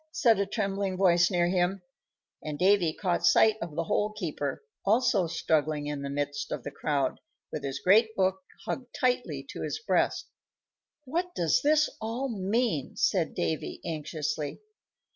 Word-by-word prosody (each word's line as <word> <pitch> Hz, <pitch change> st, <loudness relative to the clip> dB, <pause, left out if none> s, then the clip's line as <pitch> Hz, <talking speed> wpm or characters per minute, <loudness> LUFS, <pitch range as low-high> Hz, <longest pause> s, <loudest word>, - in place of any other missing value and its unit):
said 230 Hz, -8 st, +3 dB
a 200 Hz, -, +1 dB
trembling 195 Hz, -2 st, -2 dB
voice 175 Hz, -2 st, +4 dB
near 175 Hz, -2 st, +2 dB
him; 180 Hz, +1 st, 0 dB, 0.6 s
and 150 Hz, -1 st, -5 dB
Davy 185 Hz, -2 st, +4 dB
caught 175 Hz, +1 st, -1 dB
sight 220 Hz, -1 st, +5 dB
of 170 Hz, -3 st, -5 dB
the 165 Hz, -, 0 dB
Hole 210 Hz, +5 st, 0 dB
keeper, 165 Hz, -, -4 dB, 0.2 s
also 215 Hz, -3 st, +3 dB
struggling 155 Hz, -2 st, 0 dB
in 145 Hz, -1 st, -3 dB
the 140 Hz, -, -4 dB
midst 145 Hz, 0 st, -3 dB
of -, -, -3 dB
the 145 Hz, -, -5 dB
crowd, 140 Hz, -2 st, -1 dB, 0.3 s
with 150 Hz, -, -5 dB
his 135 Hz, 0 st, -3 dB
great 220 Hz, +6 st, +4 dB
book 190 Hz, -1 st, +1 dB, 0.2 s
hugged 250 Hz, -2 st, -5 dB
tightly 250 Hz, -2 st, 0 dB
to -, -, -7 dB
his -, -, -2 dB
breast. 445 Hz, -, 0 dB, 0.8 s
"What 350 Hz, +6 st, -2 dB
does 165 Hz, -2 st, +2 dB
it 300 Hz, +1 st, +5 dB, 0.2 s
all 235 Hz, +5 st, -2 dB
mean?" 210 Hz, -, -1 dB
said 180 Hz, -5 st, +1 dB
Davy, 160 Hz, -, -2 dB
anxiously. 155 Hz, -, -3 dB
185 Hz, 155 wpm, -28 LUFS, 155-220 Hz, 0.8 s, sight